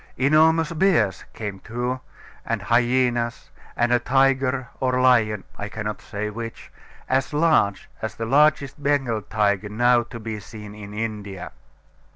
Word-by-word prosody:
Enormous 160 +4 +4
bears 160 - +2
came 105 -3 -5
too, 120 +4 -3 0.4
and 115 -1 -2
hyaenas, 120 +2 +1 0.3
and 120 0 +2
a 120 - +4
tiger 130 0 +2
or 130 -1 +1
lion 115 -5 +3 0.2
(I 105 - -4
cannot 105 0 -5
say 105 0 -4
which), 115 +1 -7 0.4
as 135 +2 0
large 150 - +2
as 110 - -4
the 115 - -4
largest 145 +2 +3
Bengal 135 -6 +1
tiger 105 -1 0
now 120 +3 +3
to 120 0 -9
be 110 -1 -5
seen 105 0 -10
in 105 -1 -10
India. 105 -4 -5
120 Hz, 140 wpm, -23 LUFS, 105-135 Hz, 0.4 s, Enormous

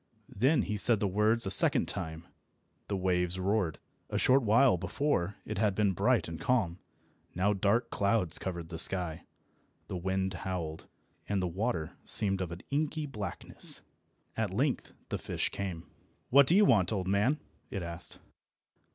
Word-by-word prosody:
Then 135 +9 +2
he 105 -2 -3
said 110 +1 +5
the 100 - 0
words 105 +4 +1
a 95 - -1
second - - +8
time. 80 +1 -5 0.6
The 100 - -2
waves 90 -1 0
roared. 95 -3 0 0.3
A - - -2
short 135 +2 +4
while 115 +1 +4
before 100 - -1
it 105 -2 -4
had 105 -2 +1
been 105 -1 +2
bright - - +1
and 80 0 -7
calm, 95 -9 0 0.6
now 95 +4 +1
dark 105 +4 0
clouds 100 -4 0
covered 85 -3 -5
the 80 -1 -5
sky, 90 -3 +3 0.6
the - - -4
wind 95 +1 -2
howled, 85 -3 -5 0.4
and 100 -1 0
the 90 - -1
water 90 -2 -3
seemed 95 -2 +1
of 90 -2 -4
an 85 +1 -8
inky 150 +1 -1
blackness. 105 -10 -5 0.5
At 110 -2 -1
length 130 +9 -1 0.2
the - - -3
fish - - -2
came. 90 -4 -5 0.5
"What 140 +1 +6
do 170 - +5
you 210 +1 +6
want, 100 - +3
old 95 -4 -2
man?" 105 +10 +1 0.3
it 100 -8 -5
asked. 85 +1 -5
100 Hz, 160 wpm, -30 LUFS, 90-115 Hz, 0.6 s, second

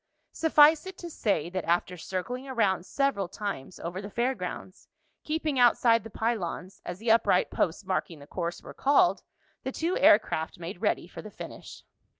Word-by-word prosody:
Suffice 315 +1 +5
it 375 -1 -8
to 345 -1 -8
say, 195 - 0
that 185 -2 -2
after 175 +2 +1
circling 195 +10 -5
around 205 -8 0
several 275 -9 0
times 185 -6 -6
over 175 +3 -5
the 200 - -7
fair 240 +5 0
grounds, 185 -2 -7 0.4
keeping 305 -3 -1
outside 235 -2 +5
the 225 - -9
pylons, 200 -5 -3
as 175 - -6
the 225 +3 +1
upright 225 -5 +3
posts 180 +4 -1
marking 185 -3 -2
the 140 - -13
course 170 +2 -4
were - - -10
called, 290 +6 +3 0.4
the 265 - -4
two 335 +6 -1
air 280 -8 +8
craft 160 -7 -4
made 175 +4 -7
ready - - 0
for - - -9
the - - -9
finish. - - -10
210 Hz, 175 wpm, -28 LUFS, 180-265 Hz, 0.4 s, air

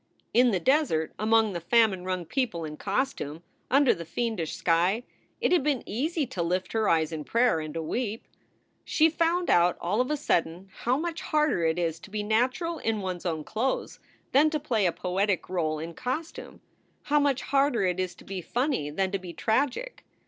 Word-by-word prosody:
In 245 +1 +5
the 195 -5 +1
desert, 215 - +1
among 220 -1 +3
the 175 - -3
famine 200 0 +3
wrung 185 -1 -2
people 215 - -2
in 150 -1 -6
costume, 195 - -2 0.3
under 275 -1 +5
the 170 - -7
fiendish 180 0 -2
sky, 180 +7 +2 0.4
it - - +1
had 360 - +4
been 280 -3 0
easy 295 - -1
to 235 -8 -4
lift 180 +2 -1
her 220 -2 +2
eyes 160 -1 +2
in 155 -2 -4
prayer 235 -1 +2
and 155 0 -6
to 165 - -2
weep. 225 +5 -3 0.6
She 320 +1 +3
found 335 +2 +1
out 175 0 +4
all 205 +7 0
of 255 - -1
a 300 - 0
sudden 175 - -1
how 250 +2 0
much 330 +1 -3
harder 300 - +1
it 160 +1 +1
is 165 -2 -1
to - - -13
be 210 +1 -3
natural 255 +10 0
in 220 -2 -1
one 185 -2 -3
s 175 - -6
own 160 -2 -2
clothes 235 - -2 0.3
than 295 +4 +5
to 305 0 -1
play 220 -8 +1
a - - +2
poetic 190 +2 -1
role 160 -4 -1
in 165 +2 -6
cos 260 - -3
tume; - - -11 0.4
how 295 0 +2
much 280 -3 +1
harder 275 -5 +2
it 180 0 0
is 185 -1 -2
to - - -15
be 190 -1 -5
funny 245 - -1
than 190 +5 -1
to 195 - -1
be 180 -2 -8
tragic. 280 - -1
215 Hz, 200 wpm, -27 LUFS, 175-265 Hz, 0.6 s, In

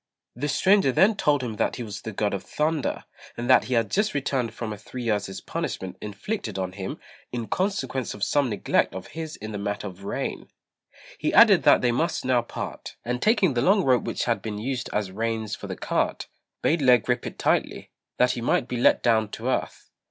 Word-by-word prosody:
The 145 +4 -2
stranger 190 -1 +4
then 200 - +4
told 145 -8 +2
him 110 -4 -4
that - - 0
he 125 - -5
was 105 -3 -7
the 110 - -5
God 105 0 -1
of 100 - -2
Thunder, 155 -1 -1 0.3
and 120 +1 -3
that 130 -2 +6
he 125 - -1
had 115 -2 +1
just 210 -1 +1
returned 130 -4 -1
from 110 -1 -5
a - - -8
three 125 +4 -7
years' 105 -4 -1
punishment 95 -1 -4
inflicted 105 - -4
on 95 -1 -2
him 95 0 -6 0.3
in 120 -2 -3
consequence 185 - -2
of 105 - -5
some 145 -3 +2
neglect 105 - +1
of 95 - -7
his 160 -1 -6
in 110 +1 -7
the 105 - -4
matter 100 +1 -3
of 95 -1 -8
rain. 100 - -4 0.7
He - - 0
added - - +8
that - - +6
they 125 - +3
must 160 +6 -1
now 125 -2 +3
part; 120 - -7
and 125 +1 -2
taking 205 - +3
the 120 - +1
long 195 - +4
rope 130 -4 +3
which - - -2
had 120 -2 0
been 110 -2 -4
used 120 +3 -3
as 105 -3 -1
reins 110 +1 -2
for - - -8
the - - -5
cart, - - -1 0.4
bade 165 - +3
Lê 125 -2 +6
grip 125 +2 -1
it - - -8
tightly, - - 0 0.3
that 125 - +4
he 120 - -4
might 120 +1 +1
be 125 - -3
let 120 - +4
down 110 -3 +3
to 115 +4 -4
earth. - - -3
120 Hz, 215 wpm, -25 LUFS, 105-135 Hz, 0.7 s, added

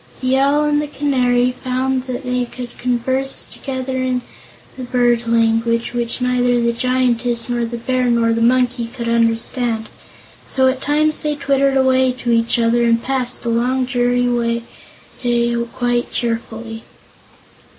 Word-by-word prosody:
The 255 0 +1
Owl 280 +2 +3
and 295 0 +2
the 300 - -3
Canary 250 -4 +1
found 260 0 -1
they 250 -1 -2
could 245 0 -9
converse 260 +2 0
together 260 -1 -5
in 255 -1 -1 0.5
the 260 - -8
bird 240 -1 +1
language, 230 0 +1
which 235 0 -2
neither 245 -1 +2
the 235 0 +1
Giantess 245 -1 0
nor 240 -1 -1
the 235 +1 -5
Bear 255 +2 -1
nor 235 -1 +2
the 230 - -1
Monkey 245 0 +2
could 235 0 -6
understand; 230 0 0 0.6
so 260 -1 +2
at 260 0 0
times 305 +1 +1
they 300 -1 -1
twittered 275 -1 +1
away 260 -1 +3
to 250 -1 -3
each 230 0 +2
other 235 0 +2
and 230 0 +2
passed 255 -2 -1
the 235 - -2
long, 250 +3 +1
dreary 245 -1 0 0.6
day 240 -1 +1 0.2
quite 245 0 -1
cheerfully. 225 -1 -4
245 Hz, 145 wpm, -18 LUFS, 235-260 Hz, 0.6 s, Owl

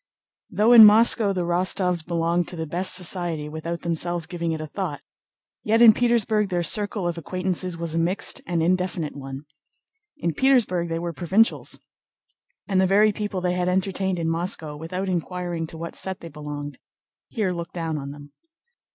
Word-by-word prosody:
Though 215 +3 +2
in 235 -2 +11
Moscow 215 0 +6
the 185 -2 -1
Rostóvs 180 0 0
belonged 170 0 0
to - - -4
the 160 -1 -4
best 175 +4 -1
society 175 -4 -1
without 160 +2 -5
themselves 170 0 -1
giving 170 0 -3
it 160 - -3
a 155 - -5
thought, 155 -2 -5 0.6
yet 225 +2 +2
in 230 -2 +9
Petersburg 220 -3 +1
their 175 -2 -1
circle 205 +1 0
of 170 -1 -3
acquaintances 185 +1 -3
was 165 -1 -4
a 165 - 0
mixed 175 +4 0
and 170 -2 0
indefinite 180 -3 -1
one. 135 +1 -8 0.7
In 170 - -2
Petersburg 210 - +2
they 165 - -2
were 170 0 -4
provincials, 190 +8 +1 0.9
and 190 -2 +2
the 190 - +3
very 210 +3 +4
people 205 -2 -4
they 180 0 0
had 180 0 0
entertained 190 0 -1
in 165 -1 -2
Moscow 165 -2 -1
without 180 +5 -5
inquiring 175 -2 -3
to 160 - -10
what 170 +1 -6
set 190 -1 -3
they 165 - -9
belonged, 145 -1 -7 0.5
here 210 -5 -2
looked 170 -1 -6
down 165 -3 -3
on 140 0 -7
them. 145 0 -12
175 Hz, 175 wpm, -24 LUFS, 165-190 Hz, 0.9 s, in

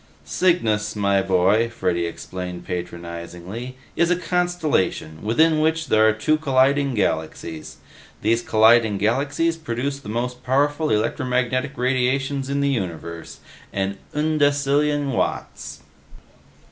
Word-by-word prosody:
"Cygnus, 110 - +1
my 100 -1 +2
boy," 95 +5 +2
Freddy 85 -7 -1
explained 90 +1 -7
patronizingly, 90 +7 -6 0.2
"is 170 - +2
a 180 - +3
constellation 175 - -1
within 155 +9 +3
which 160 +1 0
there 110 0 +5
are - - +4
two 110 +9 +1
colliding 140 -2 +2
galaxies. 80 -4 -3 0.5
These 115 +2 +2
colliding 110 -1 +4
galaxies 140 +10 0
produce 140 -2 -3
the 135 - -10
most 125 +2 -3
powerful 145 +4 +1
electromagnetic 125 +4 0
radiations 130 +2 0
in 140 0 0
the 140 - +2
universe 85 - -5 0.3
an 100 0 -2 0.2
undecillion 145 -1 +1
watts!" 125 - -3
125 Hz, 110 wpm, -22 LUFS, 100-145 Hz, 0.5 s, there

